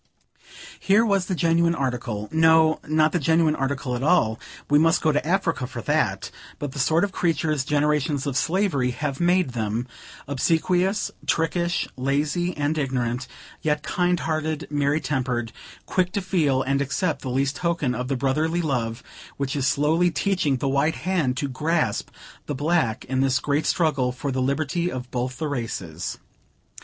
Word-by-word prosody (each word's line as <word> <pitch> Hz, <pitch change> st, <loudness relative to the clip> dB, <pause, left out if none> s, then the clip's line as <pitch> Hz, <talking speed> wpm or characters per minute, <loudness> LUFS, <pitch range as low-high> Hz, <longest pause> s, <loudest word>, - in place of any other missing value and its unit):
Here 210 Hz, +4 st, +4 dB
was 195 Hz, -4 st, +1 dB
the 185 Hz, -, -1 dB
genuine 170 Hz, 0 st, +2 dB
article 120 Hz, -6 st, -3 dB
no, 160 Hz, 0 st, +4 dB
not 155 Hz, 0 st, +3 dB
the 175 Hz, -, 0 dB
genuine 160 Hz, +1 st, +3 dB
article 135 Hz, -2 st, -2 dB
at 120 Hz, -, -4 dB
all, 115 Hz, -8 st, +2 dB, 0.3 s
we 145 Hz, 0 st, +4 dB
must 165 Hz, +2 st, +4 dB
go 155 Hz, -, +2 dB
to 150 Hz, -, 0 dB
Africa 165 Hz, -6 st, 0 dB
for 120 Hz, -4 st, -7 dB
that -, -, 0 dB, 0.3 s
but 145 Hz, -2 st, -4 dB
the 140 Hz, -, -7 dB
sort 160 Hz, +6 st, +3 dB
of 200 Hz, -, 0 dB
creatures 160 Hz, -5 st, 0 dB
generations 150 Hz, 0 st, +1 dB
of 140 Hz, -3 st, -2 dB
slavery 165 Hz, -6 st, +1 dB
have 135 Hz, +2 st, -3 dB
made 175 Hz, -4 st, +2 dB
them: 115 Hz, +1 st, -2 dB, 0.4 s
obsequious, 175 Hz, +8 st, +1 dB, 0.2 s
trickish, 170 Hz, +1 st, 0 dB
lazy 150 Hz, +7 st, 0 dB
and 150 Hz, +2 st, 0 dB
ignorant, 125 Hz, -2 st, -1 dB, 0.3 s
yet 150 Hz, -1 st, 0 dB
kind 180 Hz, -2 st, 0 dB
hearted, 155 Hz, -1 st, -2 dB
merry 145 Hz, +1 st, +1 dB
tempered, 125 Hz, -6 st, -2 dB, 0.3 s
quick 185 Hz, -1 st, 0 dB
to 200 Hz, -, 0 dB
feel 150 Hz, -8 st, +1 dB
and 140 Hz, +1 st, 0 dB
accept 140 Hz, +3 st, -1 dB
the 130 Hz, -, -4 dB
least 135 Hz, +3 st, 0 dB
token 170 Hz, -7 st, 0 dB
of 125 Hz, +1 st, -3 dB
the 135 Hz, 0 st, -1 dB
brotherly 155 Hz, +6 st, 0 dB
love 120 Hz, -6 st, -2 dB, 0.3 s
which 140 Hz, 0 st, -2 dB
is 140 Hz, -2 st, 0 dB
slowly 155 Hz, +5 st, +2 dB
teaching 180 Hz, -6 st, 0 dB
the 135 Hz, -, -2 dB
white 140 Hz, +4 st, +1 dB
hand 160 Hz, -9 st, +1 dB
to 140 Hz, -, -1 dB
grasp 155 Hz, +5 st, -1 dB, 0.4 s
the 145 Hz, -, -2 dB
black, 145 Hz, -5 st, 0 dB
in 130 Hz, 0 st, 0 dB
this 135 Hz, -1 st, +2 dB
great 145 Hz, +4 st, 0 dB
struggle 145 Hz, -7 st, +1 dB
for 135 Hz, +3 st, -4 dB
the 130 Hz, 0 st, -1 dB
liberty 155 Hz, +6 st, 0 dB
of 125 Hz, -1 st, -6 dB
both 125 Hz, 0 st, -3 dB
the 155 Hz, -, -2 dB
races. 100 Hz, -, -4 dB
145 Hz, 165 wpm, -24 LUFS, 130-165 Hz, 0.4 s, Here